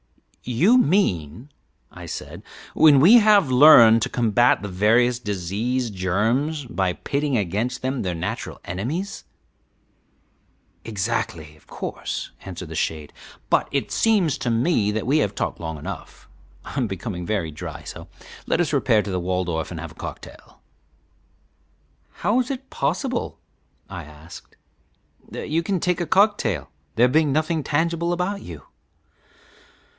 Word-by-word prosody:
"You 180 - +3
mean," 120 - 0 0.4
I - - -10
said, - - -7 0.3
"when 150 -3 +6
we 205 - +8
have 205 - +4
learned 120 -5 +8
to - - -1
combat 120 -1 +2
the - - -3
various 115 +6 +2
disease 110 +4 -2
germs 115 - -1
by 95 -6 -1
pitting 140 +5 -1
against 110 +7 -2
them 130 0 -1
their 90 -2 -2
natural 80 - -5
enemies." 135 - -4 1.6
"Exactly, 100 -8 -3
of 75 - -25
course," - - -5
answered 90 -2 -8
the 80 - -7
shade; 75 -1 -3 0.4
"but - - +2
it - - -2
seems 200 -10 +2
to 125 - -2
me 115 -2 +1
that 110 +1 -2
we 145 +5 +2
have 100 -8 -1
talked - - -3
long 80 -2 -5
enough; 70 - -9 0.4
I - - -9
am 130 -4 0
becoming 95 -2 -5
very 85 -4 -2
dry, 75 - -8
so - - -9 0.4
let - - +1
us 160 -3 0
repair 120 -6 +3
to 100 - -5
the 90 - -1
Waldorf 90 -2 -2
and 85 - -7
have 85 -1 -7
a - - -17
cocktail." - - -10 1.5
"How 220 +5 0
is 250 - -1
it 270 -1 -6
possible," 250 - -2 0.5
I - - -8
asked, 75 +2 -14 0.7
"that - - -7
you 165 +2 +2
can 185 +2 -1
take 180 +1 0
a 170 - -2
cocktail, 205 +5 +1 0.2
there 120 +2 +5
being 150 +2 +2
nothing 155 +2 0
tangible 170 +3 0
about 180 +3 -2
you?" 80 -5 -10
120 Hz, 145 wpm, -23 LUFS, -, 1.6 s, we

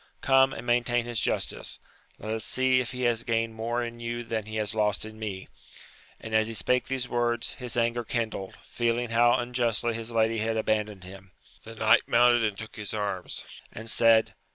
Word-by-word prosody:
Come, 135 0 +5
and - - -7
maintain 120 0 +1
his 120 -2 -2
justice: - - -2 0.4
let 110 +1 -4
us 110 -1 -3
see 130 +2 +2
if 125 - -4
he 125 0 -4
has 120 -1 +2
gained 115 -1 0
more 120 +2 -2
in 120 0 -6
you 120 0 -4
than 110 -2 -3
he 110 - -6
has 105 -1 -2
lost 105 -1 0
in 110 0 -10
me! 100 -4 -5 0.7
and, 110 - -8
as 110 0 +3
he 115 - -4
spak^ 125 +3 +1
these 130 -2 -2
words, 120 -1 -1
his 125 -2 -4
anger 120 0 +1
kindled, 110 -4 -3
feeling 120 0 -1
how 120 +1 +5
unjustly 120 -1 0
his 115 0 -5
lady 115 -1 +1
had 110 +1 -1
abandoned 105 -3 -1
him. 95 0 -12 0.3
The 115 0 -9
knight 110 +2 +4
mounted 120 0 +5
and 105 -3 -1
took 110 +2 -9
his 105 0 -5
arms, 100 -4 -3 0.3
and 110 +1 -7
said. 115 -1 +4
115 Hz, 195 wpm, -27 LUFS, 110-120 Hz, 0.7 s, Come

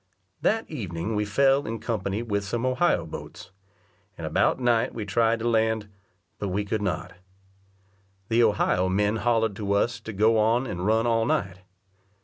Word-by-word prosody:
That 225 +1 +1
evening 100 - -4
we 105 0 0
fell 135 +6 +2
in 115 +1 -3
company 110 -1 -3
with 100 -3 -1
some 115 +5 -2
Ohio 130 - +1
boats; 90 +3 -9 0.7
and - - -6
about - - +1
night 120 -1 +1
we 110 -3 -4
tried 115 +3 +2
to 115 +1 -3
land, 110 -2 +1 0.5
but 100 - -2
we 100 +2 -1
could 105 +1 -2
not. 90 -2 -3 1.1
The 115 +1 +3
Ohio 100 -4 +2
men 105 +3 +1
hollered 115 -2 +1
to 100 -2 -1
us 110 +2 +1
to 110 - -7
go 110 +2 +3
on 115 +4 +2
and 90 -5 -3
run 110 +1 +2
all 115 -1 +2
night. 95 -5 -1
110 Hz, 165 wpm, -26 LUFS, 100-115 Hz, 1.1 s, The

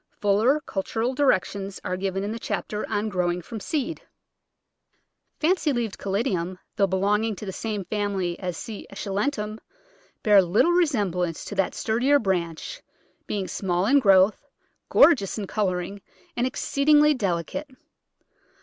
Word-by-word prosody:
Fuller 215 +8 +3
cultural 225 +1 -2
directions 200 -7 0
are 180 - -2
given 195 +1 -2
in 205 - -3
the 230 - -5
chapter 210 0 -3
on 210 0 -1
growing 180 -3 0
from 220 +6 -7
seed. 305 +6 -3 1.4
Fancy 325 -1 +2
leaved 235 -5 -2
Caladiums, 190 -3 -1 0.2
though 200 - +3
belonging 205 +4 +1
to 210 - -8
the 190 - -4
same 210 -3 -4
family 200 -4 -2
as 180 -3 -4
C. 220 -4 -7
esculentum, 210 +2 -2 0.6
bear 205 -2 +7
little 190 - +3
resemblance 205 - 0
to - - -6
that 195 -2 0
sturdier 250 +6 +2
branch, 190 - -2 0.5
being 195 -3 -2
small 180 -1 -1
in 280 +6 +5
growth, 195 -3 +4 0.4
gor 340 - +7
geous 200 - -4
in 210 - -3
colouring, 195 -1 -2 0.3
and 245 +1 +1
exceedingly 295 +3 +3
delicate. 195 - -2
205 Hz, 135 wpm, -25 LUFS, 190-240 Hz, 1.4 s, bear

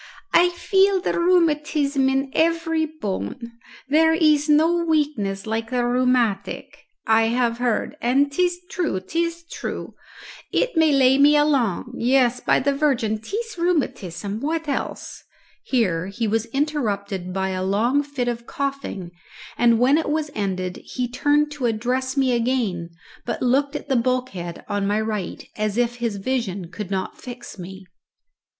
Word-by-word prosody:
"I 355 +1 +6
feel 385 +2 +2
the 355 - -1
rheumatism 300 -5 +2
in 270 0 0
every 325 -1 +1
bone. 260 -5 -4 0.5
There 320 +3 +4
is 305 -2 +3
no 325 +3 +4
weakness 290 -12 0
like 225 +1 -2
the 245 -1 0
rheumatic, 245 -5 0 0.3
I 225 0 +4
have 235 0 0
heard, 245 +1 0
and 275 +3 +2
'tis 355 +3 0
true, 325 - -1
'tis 335 - -2
true. 335 - -6 0.6
It - - 0
may 320 -1 +4
lay 265 -1 +4
me 295 +1 +6
along 255 -6 +1
yes, 250 0 +3
by - - +2
the 280 +2 +1
Virgin, 255 -7 +1
'tis 430 - -5
rheumatism 210 - -1
what 320 +4 -2
else?" 280 - -4 0.4
Here 185 -9 +1
he 220 +3 -2
was 225 +2 0
interrupted 210 - -2
by 190 +1 -1
a 185 -1 -2
long 225 +9 +2
fit 285 -4 -3
of 235 -1 -3
coughing, 275 -10 -4 0.4
and 235 -1 +4
when 265 +6 +4
it 320 - -2
was 305 0 -1
ended 185 -3 -3
he 250 -1 -3
turned 290 +4 +1
to 280 -4 -1
address 250 +4 -1
me 265 -2 +3
again, 230 -8 0 0.3
but - - -3
looked 275 +4 +2
at - - -5
the 270 - +1
bulkhead 235 -8 -2
on 205 -1 -1
my 205 +1 +1
right, 215 -4 -4
as 215 0 -1
if 240 0 +1
his 235 -3 -2
vision 200 -5 -3
could 190 +2 -6
not 190 -1 -4
fix 240 -4 -9
me. 190 +2 -9
255 Hz, 150 wpm, -23 LUFS, 215-295 Hz, 0.6 s, I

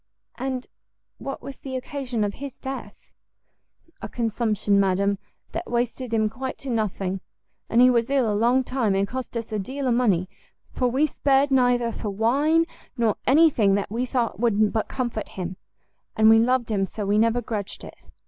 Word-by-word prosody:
"And 255 -1 -3 0.5
what 275 -2 -6
was 275 +1 -8
the 265 -1 -6
occasion 255 -4 -3
of 205 -1 -1
his 275 +1 -8
death?" 270 0 -8 0.9
"A - - -5
consumption, 220 -3 +1
madam, 200 +1 +2 0.3
that - - -5
wasted 240 +1 -2
him 220 -1 +2
quite 260 +5 -5
to 270 - -5
nothing: 195 -4 -1 0.5
and 235 - +4
he 250 - +8
was 235 0 +1
ill 270 -4 +2
a 210 - +1
long 240 +5 +3
time, 245 -6 0
and 195 +1 +1
cost 255 0 -5
us 230 0 -5
a 215 - -1
deal 265 +8 -4
of 245 - +3
money, 200 -7 +2 0.4
for 250 - 0
we 265 +5 +2
spared 280 -1 +2
neither 245 -2 +3
for 220 - -4
wine 280 +11 +2 0.3
nor 225 -3 +2
any 315 +4 +6
thing 200 -6 +3
that 200 0 -2
we 240 +3 -1
thought 240 -4 -1
would 215 -3 +2
but 220 - 0
comfort 240 -5 -3
him; 185 -1 -5 0.6
and 220 0 +6
we 225 - +7
loved 240 0 +2
him 200 -3 +1
so 210 +1 -5
we 205 +2 +2
never 230 +2 +3
grudged 215 -4 -4
it. - - -10
235 Hz, 185 wpm, -24 LUFS, 210-260 Hz, 0.9 s, he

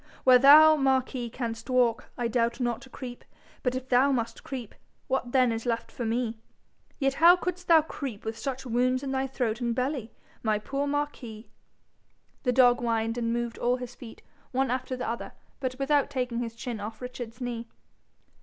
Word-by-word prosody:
'Where 255 -1 +7
thou, 305 +4 +9
Marquis, 260 -3 0
canst 230 0 -5
walk, 245 -3 +2
I 240 - 0
doubt 235 +1 0
not 240 -2 -1
to 265 - -13
creep; 245 -2 -8 0.4
but 250 0 0
if 260 0 -4
thou 260 +2 +4
must 230 -3 -2
creep, 250 -5 -6 0.3
what 260 -2 -1
then 255 -2 +4
is 225 0 -3
left 230 -1 -2
for 240 - -5
me? 230 0 -1 0.6
Yet 270 -2 +1
how 335 +4 +7
couldst 360 0 -4
thou 325 -2 +6
creep 265 -9 -6
with 220 0 -3
such 265 +3 -5
wounds 255 +2 +1
in 270 - -3
thy 265 0 0
throat 245 -3 -2
and 235 -1 0
belly, 255 -2 -2 0.3
my 215 -2 +1
poor 275 +7 -3
Marquis?' 245 -7 -4 0.9
The 250 - +1
dog 245 0 +5
whined, 230 -1 0
and 230 -1 -1
moved 235 0 -2
all 245 +1 +2
his 250 -1 -7
feet, 235 -2 -12 0.3
one 260 -1 0
after 255 0 -2
the 250 - -4
other, 235 +1 -4 0.3
but 255 -2 -3
without 280 +1 +2
taking 250 -4 -2
his 230 -2 -4
chin 235 -2 -5
off 215 +2 -6
Richard's 245 -1 -7
knee. 240 -2 -4
250 Hz, 185 wpm, -28 LUFS, 230-265 Hz, 0.9 s, thou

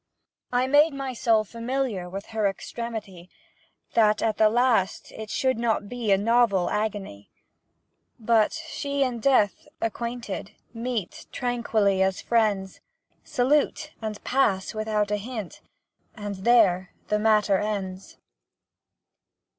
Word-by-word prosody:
I 250 +1 +2
made 290 +3 +4
my 270 -1 -4
soul 225 -2 +2
familiar 230 -4 -3
With 195 +2 -6
her 215 -2 +2
extremity, 200 -3 -6 0.6
That 215 -2 +3
at 220 -2 0
the 215 -1 +5
last 230 -4 +1
it 220 -1 -8
should 260 -2 0
not 225 -3 0
be 235 -2 -2
A 195 - +6
novel 220 -3 +2
agony, 205 - -3 0.9
But 225 -1 +3
she 285 -3 -2
and 245 -3 -2
Death, 215 -4 +2
acquainted, 230 -3 -4 0.2
Meet 230 -4 -4
tranquilly 225 -5 +1
as 190 0 +1
friends, 210 -5 0 0.4
Salute 290 +4 +1
and 215 -1 -5
pass 210 -8 +1
without 215 -1 -1
a 210 - +1
hint 215 -2 -7 0.5
And 205 -2 -5
there 190 -4 +3
the 210 - +2
matter 210 -3 +3
ends. 195 -3 -4
220 Hz, 120 wpm, -25 LUFS, 200-245 Hz, 0.9 s, A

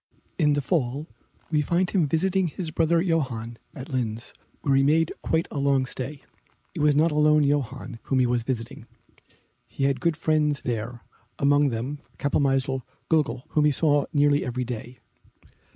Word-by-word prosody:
In 150 -3 +4
the 145 -1 0
fall 140 0 -1 0.5
we 150 -2 +3
find 175 +4 0
him 175 -7 +2
visiting 185 +5 +1
his 165 0 -5
brother 165 +1 +2
Johann 125 -10 -2 0.2
at 130 - -8
Linz, 115 -4 -3 0.3
where 140 - +2
he 135 - +5
made 155 +3 +3
quite 160 +1 0
a 145 - -3
long 140 -1 +2
stay. 135 +3 -5 0.5
It - - -6
was 150 -1 +4
not 155 +3 +3
alone 150 0 +4
Johann 135 -3 -1
whom 135 - 0
he 130 - +4
was 120 0 +1
visiting; 115 -1 -4 0.8
he - - -5
had 135 -2 +1
good 165 -1 +1
friends 150 -2 +1
there, 120 0 -4 0.4
among 145 +1 +4
them 125 +5 -4 0.2
Kapellmeister 135 -2 +1 0.3
Glöggl, 150 -5 +1
whom 150 -1 +2
he 150 - +5
saw 145 0 +2
nearly 145 -1 +3
every 125 0 -2
day. 120 +1 -6
145 Hz, 165 wpm, -25 LUFS, 130-155 Hz, 0.8 s, he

